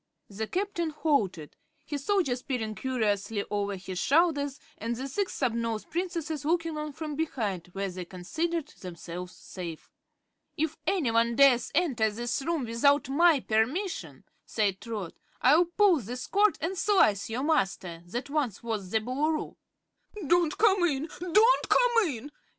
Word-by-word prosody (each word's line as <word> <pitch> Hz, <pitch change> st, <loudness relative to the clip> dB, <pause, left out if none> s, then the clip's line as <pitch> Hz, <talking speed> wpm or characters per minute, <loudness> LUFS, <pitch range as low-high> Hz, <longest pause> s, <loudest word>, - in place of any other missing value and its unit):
The 215 Hz, +2 st, -4 dB
Captain 365 Hz, -, -1 dB
halted, 215 Hz, -, -1 dB, 0.3 s
his 290 Hz, -3 st, -4 dB
soldiers 320 Hz, -9 st, +1 dB
peering 230 Hz, -6 st, -3 dB
curiously 210 Hz, -4 st, -1 dB
over 205 Hz, -1 st, -1 dB
his 185 Hz, -1 st, -6 dB
shoulders 285 Hz, -, +2 dB, 0.2 s
and 230 Hz, +2 st, -2 dB
the 260 Hz, +3 st, -4 dB
Six 385 Hz, +8 st, -2 dB
Snubnosed 230 Hz, -3 st, -1 dB
Princesses 335 Hz, -3 st, -3 dB
looking 330 Hz, +1 st, 0 dB
on 300 Hz, 0 st, -4 dB
from 305 Hz, 0 st, -5 dB
behind, 220 Hz, -, -2 dB
where 195 Hz, 0 st, -2 dB
they 180 Hz, -1 st, -6 dB
considered 315 Hz, -, -3 dB
themselves 180 Hz, 0 st, -8 dB
safe. 170 Hz, -4 st, -8 dB, 0.7 s
"If 315 Hz, 0 st, -1 dB
anyone 235 Hz, -9 st, +2 dB
dares 255 Hz, -3 st, +5 dB
enter 265 Hz, -10 st, +2 dB
this 235 Hz, +4 st, -3 dB
room 315 Hz, -2 st, -1 dB
without 275 Hz, +5 st, +2 dB
my 315 Hz, 0 st, +4 dB
permission," 260 Hz, -, -1 dB, 0.2 s
said 200 Hz, -4 st, -1 dB
Trot, 210 Hz, -7 st, -5 dB, 0.3 s
"I'll 305 Hz, +7 st, +5 dB
pull 360 Hz, -1 st, +3 dB
this 245 Hz, +2 st, -6 dB
cord 410 Hz, 0 st, +3 dB
and 350 Hz, +4 st, -1 dB
slice 355 Hz, -, +3 dB
your 240 Hz, +4 st, -2 dB
master 190 Hz, -, 0 dB
that 240 Hz, +9 st, -4 dB
once 265 Hz, -8 st, -1 dB
was 215 Hz, -5 st, -3 dB
the 220 Hz, +2 st, +1 dB
Boolooroo." 295 Hz, +7 st, -1 dB, 0.7 s
"Don't 340 Hz, +1 st, +2 dB
come 400 Hz, -4 st, +4 dB
in! 305 Hz, -2 st, 0 dB
Don't 420 Hz, +8 st, +4 dB
come 475 Hz, -4 st, +4 dB
in!" 280 Hz, 0 st, -6 dB
270 Hz, 145 wpm, -28 LUFS, 215-330 Hz, 0.7 s, dares